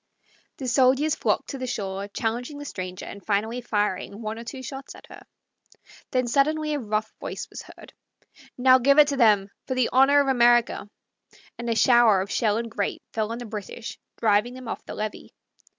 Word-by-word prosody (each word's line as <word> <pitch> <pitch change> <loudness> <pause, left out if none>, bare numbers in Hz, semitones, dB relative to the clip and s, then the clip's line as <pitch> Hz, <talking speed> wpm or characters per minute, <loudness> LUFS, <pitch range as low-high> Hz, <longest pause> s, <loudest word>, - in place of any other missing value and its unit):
The 265 - -5
soldiers 265 +4 +3
flocked - - -1
to 275 - -6
the 255 - -4
shore, 200 -4 -4
challenging 240 +7 -3
the 290 - -8
stranger, 185 -7 -6
and 200 - -9
finally 220 +4 -1
fired 205 -4 -1
one 220 +1 -5
or - - -7
two 260 +2 -8
shots 270 +1 -8
at - - -14
her. - - -12 0.9
Then 255 -1 +1
suddenly 305 +4 +1
a 295 - -1
rough 215 -2 -2
voice - - -6
was - - -7
heard, - - -14 0.6
"Now 255 +1 +6
give 280 +3 +4
it 295 -1 +7
to 280 - -2
them, 205 -5 +4 0.2
for 260 - -2
the 255 -2 +2
honor 270 +3 +6
of 280 - +2
America!" 240 -4 +3 0.7
and 235 0 -4
a 230 - +1
shower 235 -4 +5
of 195 - -5
shell 215 -3 +1
and 230 0 -4
grape 205 -2 -3
fell 220 0 -1
on 230 - -3
the 245 - -7
British, 220 +1 -7 0.2
driving 220 +3 +2
them 255 -2 -9
off - - -5
the - - -7
levee. 215 0 -5
235 Hz, 195 wpm, -25 LUFS, 215-260 Hz, 0.9 s, it